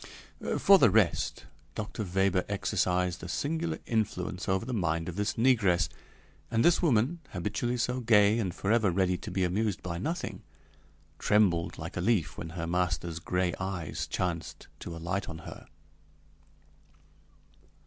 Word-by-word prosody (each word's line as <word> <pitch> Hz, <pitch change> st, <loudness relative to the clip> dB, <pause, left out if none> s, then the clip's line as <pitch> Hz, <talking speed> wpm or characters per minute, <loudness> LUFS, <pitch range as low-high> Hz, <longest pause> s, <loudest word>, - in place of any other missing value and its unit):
For 195 Hz, -1 st, +7 dB
the -, -, +6 dB
rest, 105 Hz, -6 st, +1 dB, 0.3 s
Dr. 110 Hz, 0 st, -4 dB
Weber 95 Hz, -1 st, +1 dB
exercised 90 Hz, -3 st, 0 dB
a -, -, -6 dB
singular 160 Hz, +2 st, -2 dB
influence 95 Hz, -5 st, -2 dB
over 95 Hz, +3 st, +1 dB
the 130 Hz, -, -4 dB
mind 85 Hz, -6 st, 0 dB
of 90 Hz, -, -5 dB
this 105 Hz, +1 st, -1 dB
negress, 115 Hz, -8 st, +3 dB, 0.6 s
and 115 Hz, 0 st, +2 dB
this 170 Hz, -, +5 dB
woman, 145 Hz, +1 st, +2 dB
habitually 110 Hz, +6 st, -2 dB
so 125 Hz, +1 st, 0 dB
gay 110 Hz, -2 st, +4 dB
and 95 Hz, -5 st, -1 dB
forever 105 Hz, +3 st, +2 dB
ready 90 Hz, 0 st, +1 dB
to -, -, -8 dB
be 95 Hz, -, 0 dB
amused 100 Hz, +2 st, 0 dB
by 85 Hz, -1 st, -4 dB
nothing, 170 Hz, -, -3 dB, 0.8 s
trembled 95 Hz, -6 st, +2 dB
like 80 Hz, +3 st, -6 dB
a -, -, 0 dB
leaf 100 Hz, -4 st, +1 dB
when 85 Hz, -, -6 dB
her 80 Hz, -, -2 dB
master's 85 Hz, -1 st, -1 dB
gray 90 Hz, +1 st, 0 dB
eyes 95 Hz, -4 st, -3 dB
chanced 85 Hz, -3 st, -3 dB
to 85 Hz, -, -7 dB
alight 90 Hz, +4 st, -3 dB
on 80 Hz, -, -6 dB
her. -, -, -10 dB
95 Hz, 145 wpm, -29 LUFS, 90-115 Hz, 0.8 s, For